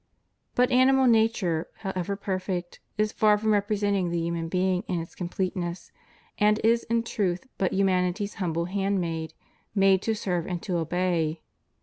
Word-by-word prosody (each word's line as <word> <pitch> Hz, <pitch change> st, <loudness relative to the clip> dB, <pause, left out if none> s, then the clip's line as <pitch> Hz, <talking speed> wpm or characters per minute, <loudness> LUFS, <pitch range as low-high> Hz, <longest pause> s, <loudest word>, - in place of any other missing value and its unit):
But 250 Hz, 0 st, +3 dB
animal 260 Hz, +1 st, +5 dB
nature, 220 Hz, -8 st, +2 dB
however 190 Hz, -1 st, -2 dB
perfect, 185 Hz, -3 st, -4 dB, 0.2 s
is 215 Hz, 0 st, +1 dB
far 210 Hz, -1 st, +4 dB
from 215 Hz, +1 st, +1 dB
representing 205 Hz, -2 st, +1 dB
the 170 Hz, -, -1 dB
human 165 Hz, 0 st, -2 dB
being 185 Hz, 0 st, +1 dB
in 175 Hz, -, -1 dB
its 165 Hz, -, -7 dB
completeness, 180 Hz, -1 st, -4 dB, 0.5 s
and 210 Hz, +1 st, +4 dB
is 230 Hz, +1 st, +3 dB
in 230 Hz, 0 st, +1 dB
truth 190 Hz, -4 st, -1 dB
but 190 Hz, -, +1 dB
humanity's 190 Hz, +1 st, +1 dB
humble 170 Hz, -2 st, 0 dB
handmaid, 180 Hz, -4 st, -2 dB, 0.4 s
made 195 Hz, -1 st, +4 dB
to 220 Hz, +1 st, 0 dB
serve 180 Hz, -5 st, -2 dB
and 180 Hz, -2 st, -3 dB
to 180 Hz, -3 st, -1 dB
obey. 165 Hz, -1 st, -1 dB
190 Hz, 145 wpm, -26 LUFS, 175-210 Hz, 0.5 s, animal